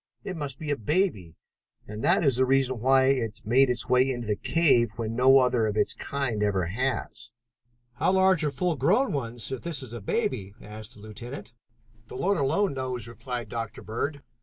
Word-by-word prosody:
It 195 -2 -5
must 145 -5 -5
be 155 -2 -4
a - - +2
baby, 115 - -1 0.5
and 105 +1 -7
that - - +3
is 135 -4 +3
the 130 - +3
reason 130 -2 +2
why 130 +3 +4
it 115 -5 0
made 130 +4 +4
its 125 -1 +2
way 125 +1 +3
into 120 -2 -3
the 105 -1 0
cave 135 -5 +2
when 115 0 -4
no 130 +2 +6
other 125 -4 +3
of 105 0 -2
its 105 - +2
kind 135 -7 -3
ever 100 -4 +1
has." 115 +3 -3 0.6
"How 155 +9 +1
large 190 -3 +3
are 150 - +1
full 165 +5 -1
grown 200 - +2
ones 120 -4 -3
if 130 - -4
this 165 -5 -4
is 120 -3 -9
a 120 - -6
baby?" 100 -1 -2
asked 110 +2 -9
the 105 - -15
lieutenant. 115 +4 -9 0.5
"The - - -8
Lord 195 +1 +1
alone 155 +7 +1
knows," 130 -4 -4
replied 120 0 -6
Dr. 115 -1 -5
Bird. 140 +6 -4
125 Hz, 195 wpm, -27 LUFS, 115-140 Hz, 0.6 s, no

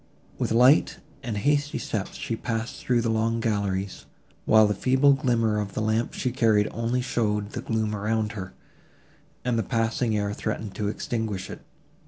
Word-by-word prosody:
With - - -1
light 125 +6 +5 0.2
and 110 -4 -4
hasty 145 +6 +1
steps 105 -3 -4
she 115 - -3
passed 115 0 -3
through 120 -2 +2
the 115 -1 0
long 115 +1 +1
galleries, 100 -3 -2 0.4
while 110 0 +6
the 105 - +1
feeble 130 +6 +4
glimmer 115 -5 +1
of 100 -2 -4
the - - -1
lamp 110 +2 0
she 125 - -1
carried 110 -4 +3
only 115 +2 -1
showed 105 -5 -1
the 120 - -4
gloom 110 -4 -1
around 105 +1 -1
her, 95 -4 -7 0.9
and 120 -2 +1
the - - +3
passing 115 +1 0
air 105 0 -1
threatened 110 -1 -4
to 105 - -2
extinguish 105 -2 -3
it. - - -9
110 Hz, 170 wpm, -26 LUFS, 105-120 Hz, 0.9 s, while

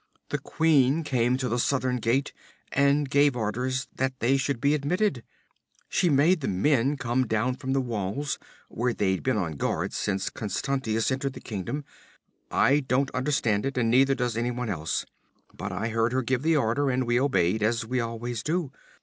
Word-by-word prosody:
"The - - -1
queen 155 -1 +2
came 125 -3 +1
to 130 -1 -2
the 120 +1 -1
southern 130 0 +1
gate 125 +4 0 0.4
and 140 +1 +3
gave 140 0 +3
orders 125 +4 -2
that 130 0 -1
they 125 +4 +3
should 135 -2 -1
be 140 +4 +2
admitted. 150 - 0 0.7
She 180 - +2
made 155 +4 +4
the 130 - -2
men 135 +8 +2
come 125 0 0
down 115 +4 0
from 135 -2 -3
the 135 - +2
walls, 120 +3 -3 0.3
where 120 +1 -1
they've 95 -2 0
been 130 -3 0
on 80 -7 -2
guard - - -1
since 95 -2 -1
Constantius 115 +2 -1
entered 135 +1 -2
the - - -9
kingdom. 115 +7 -5 0.6
I 140 +2 +3
don't 135 0 0
understand 130 -6 0
it, 135 -1 -3
and 115 -2 +2
neither 135 +2 +4
does 125 -3 -1
anyone 120 0 -2
else, 80 -5 -2 0.5
but - - -5
I 105 +5 -2
heard 115 +1 +1
her 130 0 +1
give 125 +1 0
the 160 +1 +3
order, 135 +2 +1
and 130 0 0
we 120 +1 +2
obeyed 110 -7 +1
as 115 +2 +1
we 125 +2 -1
always 115 0 -3
do. 160 -1 -1
130 Hz, 180 wpm, -27 LUFS, 115-140 Hz, 0.7 s, made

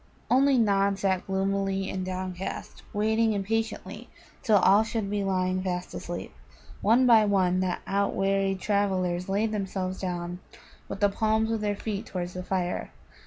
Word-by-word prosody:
Only 270 +1 +5
Nod 200 -3 +2
sat 190 -2 0
gloomy 195 0 0
and 185 - -3
downcast, 185 0 -5
waiting 220 +1 +2
impatiently 220 +3 -3 0.3
till 215 -3 +4
all 200 +3 +5
should 220 -3 -3
be 205 -1 0
lying 185 -1 0
fast 180 -1 -3
asleep. - - -6 0.5
One 235 +5 +4
by 230 -3 +7
one 185 -3 +2
the 185 -1 0
outwearied 195 -1 0
travellers 185 -3 0
laid 210 +3 +1
themselves 190 -2 -3
down, 175 -1 -4 0.5
with 195 - -6
the 205 - +5
palms 220 +2 +1
of 225 -1 -1
their 205 -1 0
feet 210 +1 -4
towards 180 -1 -4
the 180 - -5
fire. 180 -1 -2
195 Hz, 150 wpm, -27 LUFS, 185-215 Hz, 0.5 s, by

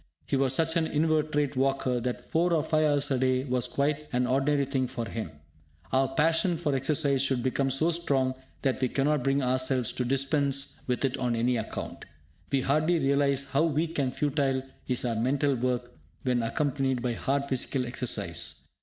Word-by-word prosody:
He - - -1
was 135 -1 +2
such 160 +1 +1
an 160 -1 +1
inveterate 150 -2 +1
walker 135 -1 +1
that 125 +1 -4
four 170 +2 +1
or 155 -3 +2
five 155 -1 +2
hours 145 -1 +2
a 130 - +2
day 130 0 +2
was 125 -2 0
quite 145 +4 -1
an 125 0 +1
ordinary 140 +2 +2
thing 130 -2 -1
with 115 -1 -2
him! 110 -6 -4 0.6
Our 135 0 +3
passion 165 +5 +2
for 155 -4 -1
exercise 140 0 +2
should 130 -3 0
become 135 +1 0
so 155 +6 +2
strong 140 -6 +1 0.3
that 135 -1 0
we 130 - +2
cannot 145 +1 +1
bring 135 +1 +1
ourselves 130 -1 +1
to 125 - -2
dispense 135 +1 0
with 125 +2 0
it 135 0 -1
on 125 -2 0
any 120 +2 +1
account. 110 - -5 0.5
We 135 - +2
hardly 155 +6 +2
realise 140 -1 +2
how 140 +5 +3
weak 160 0 -1
and 130 -2 +1
futile 135 -2 0 0.2
is 125 -1 0
our 115 -2 0
mental 135 +4 +1
work 125 -1 -1 0.3
when 125 -2 +1
unaccompanied 130 0 -1
by 125 -1 0
hard 140 +4 -1
physical 130 -1 -1
exercise. 100 -8 -3
135 Hz, 180 wpm, -28 LUFS, 125-145 Hz, 0.6 s, Our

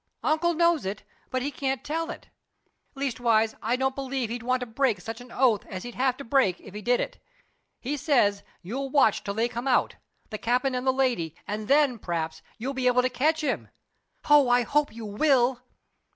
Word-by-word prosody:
Uncle 335 +2 +2
knows 335 -2 +3
it, 195 +2 -4 0.3
but 255 -1 -1
he 285 - -2
can't 265 -1 -2
tell 325 +3 -2
it. - - -8 0.7
Leastwise 235 -5 +1
I 230 +3 +1
don't 265 +1 0
believe 265 -3 -3
he'd 240 0 -4
want 255 +2 0
to - - -2
break 235 -3 0
such 225 +6 -7
an 245 -1 -13
oath 245 -6 +2
as 185 -1 -6
he'd 245 - -7
have 255 0 +1
to 280 - -7
break 230 -8 +2
if 195 - -13
he 210 - -6
did 245 +4 +2
it. - - -4 0.6
He 275 +4 -3
says 225 -9 +2 0.2
you'll 265 +9 -4
watch 265 -6 +3
till 200 -1 -4
they 225 +2 +1
come 240 +2 -5
out 255 - +2 0.3
the 215 - -4
cap'n 250 +3 +1
and 250 +1 -2
the - - +6
lady 245 - 0
and 210 +1 -4
then, 275 -3 +3
p'raps, 165 -4 -3 0.2
you'll 255 +4 -3
be 260 -1 0
able 250 0 +4
to 255 - +2
catch 310 +6 +1
him. 290 -3 -2 0.6
Oh, 295 -4 +6
I 245 0 +4
hope 295 +4 +1
you 225 0 -8
will!" 250 +3 +2
250 Hz, 205 wpm, -26 LUFS, 225-275 Hz, 0.7 s, the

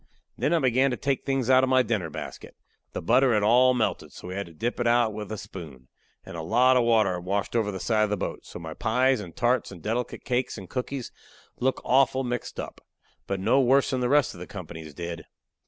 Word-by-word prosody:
Then - - 0
I 170 - +4
began 130 -2 +3
to 120 - -2
take 140 -1 -1
the - - -37
things 135 -3 0
out 130 0 +5
of 130 - +2
my 130 -1 +4
dinner 105 -9 -1
basket. - - -8 0.4
The - - -4
butter 125 +4 +4
had 105 - +2
all 125 +4 +5
melted, 115 -3 -1
so 90 - -10
we - - -5
had 100 -1 -4
to 85 - -14
dip 120 +10 -3
it 120 - +1
out 120 -2 +3
with 105 -1 -6
a 110 - -3
spoon. 80 -11 -10 0.4
And - - -9
a 80 - -4
lot 125 +10 +4
of 125 - +4
water 110 -5 +3
had 90 -1 -5
washed 100 +4 -2
over 110 -3 +1
the 95 - -6
side 110 0 +2
of - - -5
the 105 - 0
boat, - - -4
so - - -10
my 80 -2 -7
pies 125 +7 +2
and 90 -5 -9
tarts 120 -1 +1
and 90 - -10
delicate 115 +7 -3
cakes 125 -2 -1
and 95 -3 -9
cookies 125 +3 -4 0.5
looked 130 +1 0
awful 135 0 +3
mixed 120 -2 -4
up. - - -7 0.5
But 100 -1 -2
no 135 +8 +4
worse 135 +2 +3
than 130 - 0
the 125 - +1
rest 145 0 +3
of - - -12
the - - -8
company's 80 -2 -9
did. 85 0 -6
115 Hz, 245 wpm, -26 LUFS, 95-130 Hz, 0.5 s, out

